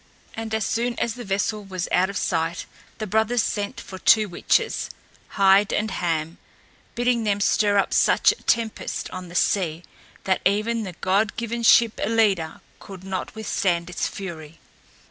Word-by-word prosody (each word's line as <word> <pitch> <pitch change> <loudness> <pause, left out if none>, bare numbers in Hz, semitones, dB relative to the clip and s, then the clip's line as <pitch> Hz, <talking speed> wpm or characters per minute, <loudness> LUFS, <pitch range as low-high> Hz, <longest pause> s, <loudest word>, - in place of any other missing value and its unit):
And 225 -1 -4
as 220 -3 -1
soon 235 +3 -1
as 235 - -1
the 245 +1 -8
vessel 205 +1 -1
was 185 -3 -4
out 185 +2 +3
of 200 - -4
sight 165 -1 -1 0.3
the 215 - -4
brothers 220 +3 +1
sent 205 -1 -3
for 190 - -9
two 215 +1 +5
witches 175 - 0 0.5
Heid 195 +1 +5
and 215 +1 -1
Ham 165 -1 -2 0.6
bidding 240 -1 +1
them 205 -2 0
stir 205 0 +2
up 200 - +1
such - - +4
a - - -10
tempest 230 -2 -1
on 185 -1 -7
the 175 - -11
sea 175 -4 0 0.4
that 190 -1 0
even 215 +4 +1
the 185 - -7
god 200 +3 +1
given 235 0 -3
ship 230 -1 +5
Ellida 200 -7 +1 0.2
could 190 -2 -11
not 190 +1 -5
withstand 180 -5 -1
its 175 - -1
fury. 165 -5 -8
200 Hz, 165 wpm, -23 LUFS, 185-220 Hz, 0.6 s, two